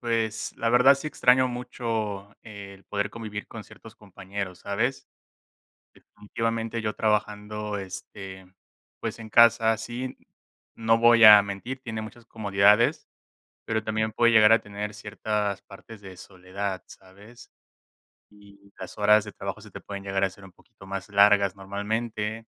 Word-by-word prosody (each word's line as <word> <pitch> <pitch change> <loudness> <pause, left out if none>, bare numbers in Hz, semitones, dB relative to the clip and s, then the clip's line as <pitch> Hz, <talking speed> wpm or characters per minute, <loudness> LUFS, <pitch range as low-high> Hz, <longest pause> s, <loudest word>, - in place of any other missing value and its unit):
pues, 115 -2 -2
la 115 - 0
verdad 125 +3 +6
sí 145 - -7
extraño 130 -3 +3
mucho 115 -5 -4
el 100 -2 -11
poder 100 0 -2
convivir 105 -2 -7
con 110 -3 -9
ciertos 115 - -15
compañeros, 95 -2 -7
¿sabes?, 115 +7 -2 0.9
definitivamente 115 +2 -4
yo 105 0 -2
trabajando, 105 -1 -2
este, 95 0 -9 0.5
pues - - -5
en 110 -1 -10
casa, 115 0 +5
sí, 120 +3 -6 0.6
no 115 0 +2
voy 115 0 +6
a 105 -1 +10
mentir, 100 +7 -6
tiene 110 -3 -5
muchas 115 +2 -12
comodidades, 105 0 +2 0.6
pero 110 -1 -2
también 110 0 -2
puede 115 +2 +3
llegar 110 0 +6
a 115 - +5
tener 105 +1 -6
ciertas 105 -1 -3
partes 105 +2 -14
de 95 -2 -11
soledad, 95 +1 -6
¿sabes?, 100 +6 -16 0.8
y 100 -1 -20
las - - -9
horas 105 +1 +4
de 105 - -8
trabajo - - -7
se - - -14
te - - -10
pueden 100 -1 -8
llegar 95 0 -1
a 95 - +2
ser 95 +1 -17
un 95 - -15
poquito 95 - -19
más 95 0 -6
largas 100 -1 +4
normalmente, 105 +3 -4
105 Hz, 145 wpm, -25 LUFS, 100-115 Hz, 0.9 s, a